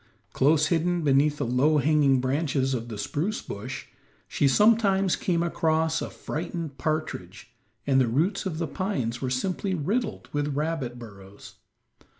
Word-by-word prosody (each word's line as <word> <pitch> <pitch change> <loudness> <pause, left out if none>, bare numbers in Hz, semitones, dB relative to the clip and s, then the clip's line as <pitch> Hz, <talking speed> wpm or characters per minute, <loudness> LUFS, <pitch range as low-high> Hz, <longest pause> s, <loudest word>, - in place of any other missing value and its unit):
Close 150 +3 +3
hidden 175 +1 +1
beneath 145 +1 +3
the - - -1
low 130 +6 +3
hanging 145 -2 +3
branches 135 0 0
of 120 -2 -3
the 110 -3 -6
spruce 165 - -2
bush, 100 - -7 0.4
she 140 - +1
sometimes 195 - +4
came 170 -2 0
across 160 -1 +1
a - - -4
frightened 160 -3 -5
partridge, 115 - -4 0.3
and 135 -1 +3
the 125 - +2
roots 175 - 0
of 160 -4 -4
the 165 - -1
pines 135 - -3
were 130 - -1
simply 185 +8 -1
riddled 210 - -2
with 145 -1 -1
rabbit 150 -5 -2
burrows. 100 -4 -12
150 Hz, 150 wpm, -26 LUFS, 130-170 Hz, 0.4 s, sometimes